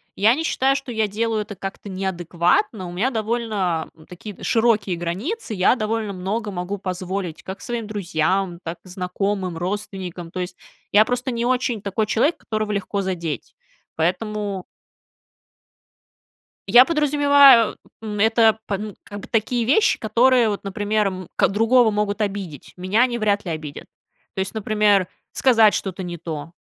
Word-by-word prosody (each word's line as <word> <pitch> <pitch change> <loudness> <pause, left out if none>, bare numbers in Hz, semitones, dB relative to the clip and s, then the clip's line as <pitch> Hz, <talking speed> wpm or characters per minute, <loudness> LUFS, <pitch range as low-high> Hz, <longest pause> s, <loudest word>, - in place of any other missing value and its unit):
я 220 +5 +4
не 320 - -3
считаю, 270 -3 +2
что 270 -3 -5
я 220 -2 0
делаю 220 +1 -1
это 205 -1 -7
как-то 195 +2 -7
неадекватно. 185 +2 0
У - - -7
меня 210 +9 0
довольно 215 -7 -1 0.2
такие 185 +3 -9
д - - -14
широкие 220 -6 +2
границы, 215 - -4
я 190 +5 +3
довольно 215 -2 -2
много 205 +4 -3
могу 185 +2 -4
позволить 185 -2 -4
как 190 +1 -7
своим 235 -3 -4
друзьям, 185 -2 -1
так 170 +1 -5
и - - -17
знакомым, 185 0 -2
родственникам. 185 -2 -5
То 185 - -4
есть 180 - -6 0.3
я 215 +2 +6
просто 250 +1 -2
не 235 0 -2
очень 250 -4 0
такой 205 +2 -1
человек, 255 +10 +1
которого 215 -1 -3
легко 200 0 -2
задеть, 170 -5 -4 0.4
поэтому 195 +3 -2 2.0
Я 245 +6 +8
подразумеваю, 285 -6 +5 0.2
м, 210 -2 -5
это 220 0 +4
пан 205 0 -4
как 205 -1 -8
бы - - -10
такие 230 +1 0
вещи, 430 - +3
которые 235 +1 +3
вот, 205 - -3
например, 205 +1 0
м, 185 -2 -5
ко - - +4
другого 225 +3 +4
могут 210 +1 -1
обидеть, 195 -8 -4
меня 195 +7 +2
они 240 -2 0
вряд 205 -2 0
ли 170 - -3
обидят. 155 -2 -6 0.5
То - - -4
есть, 190 +2 -2
например, 210 -3 +2 0.2
сказать 225 -5 +4
что-то 190 -1 -3
не 175 -1 -5
то, 160 0 -6
205 Hz, 155 wpm, -22 LUFS, 185-225 Hz, 2.0 s, Я